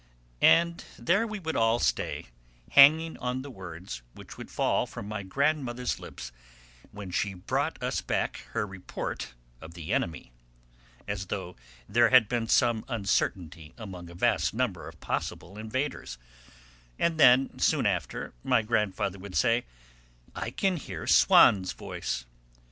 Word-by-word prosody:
And 170 0 +4
there 190 - +1
we 215 -1 -5
would 160 -5 -4
all 115 +1 +3
stay, 120 - -1 0.4
hanging 160 +4 +6
on 125 +1 -3
the 140 - -8
words 90 - -8
which - - -11
would - - -10
fall - - 0
from 100 - -8
my 105 0 -4
grandmother's 125 +3 -1
lips 60 0 -9 0.6
when 100 -2 -8
she 95 +2 -1
brought 90 - -2
us - - -1
back - - -1 0.2
her 115 -2 0
report 95 -10 -6 0.3
of 80 +1 -11
the 80 -3 -4
enemy, 80 -7 -2 0.8
as 100 -2 -4
though 90 -1 -5 0.3
there 120 +2 +4
had 130 -4 +6
been 115 0 -1
some 115 -1 +3
uncertainty 90 - -2
among 95 -6 -8
a 85 - -12
vast - - +1
number - - -2
of - - -12
possible 85 +5 -4
invaders, 130 - -4 0.8
and 165 -2 0
then, 130 -1 +5
soon - - +2
after, - - -2
my 125 -4 +2
grandfather 105 -3 -1
would 95 -1 -9
say: 115 +1 +2 0.7
"I 115 - -4
can 185 +8 0
hear 150 - -7
Swann's 95 -2 +5
voice." 60 - -5
110 Hz, 145 wpm, -28 LUFS, 95-130 Hz, 0.8 s, hanging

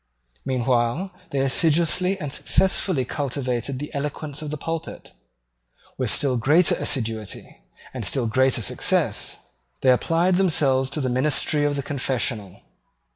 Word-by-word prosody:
Meanwhile 125 +7 0 0.2
they 140 -4 -1
assiduously 170 +7 +2
and 145 -4 -5
successfully 185 -7 +1
cultivated 130 -1 -3
the 150 +3 -7
eloquence 145 +1 -4
of 155 - -5
the 150 - -4
pulpit. 165 +2 -6 0.8
With 130 -4 -1
still 130 +5 +2
greater 155 +9 +4
assiduity 110 -5 -3 0.3
and - - -5
still 130 -3 0
greater 130 +1 +2
success - - 0 0.4
they 130 - +5
applied 170 +8 +2
themselves 140 -8 +2
to 150 - -3
the 130 - -1
ministry 145 +3 +1
of 145 0 0
the 140 - -3
confessional. 125 - -2
140 Hz, 130 wpm, -23 LUFS, 125-155 Hz, 0.8 s, they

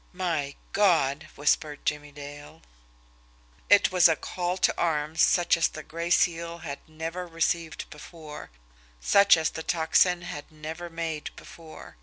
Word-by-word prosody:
"My 165 -6 -2 0.2
God!" 160 -8 +2
whispered 145 +1 0
Jimmie 150 -1 -2
Dale. 145 - -11 1.1
It 205 -2 +6
was 180 -2 +6
a 160 - +2
call 180 +2 -3
to - - +2
arms 155 -1 0
such 175 -1 +4
as 170 - +2
the 155 - -9
Gray 170 +2 -5
Seal 170 -1 +1
had 140 -2 -5
never 165 +3 -5
received 165 -1 -2
before 150 0 -10 0.5
such 200 - +5
as 160 -1 0
the 160 - -6
Tocsin 175 +2 +2
had 150 -5 -8
never 160 +3 -7
made 165 -2 -4
before. 160 - -13
160 Hz, 140 wpm, -27 LUFS, 150-175 Hz, 1.1 s, It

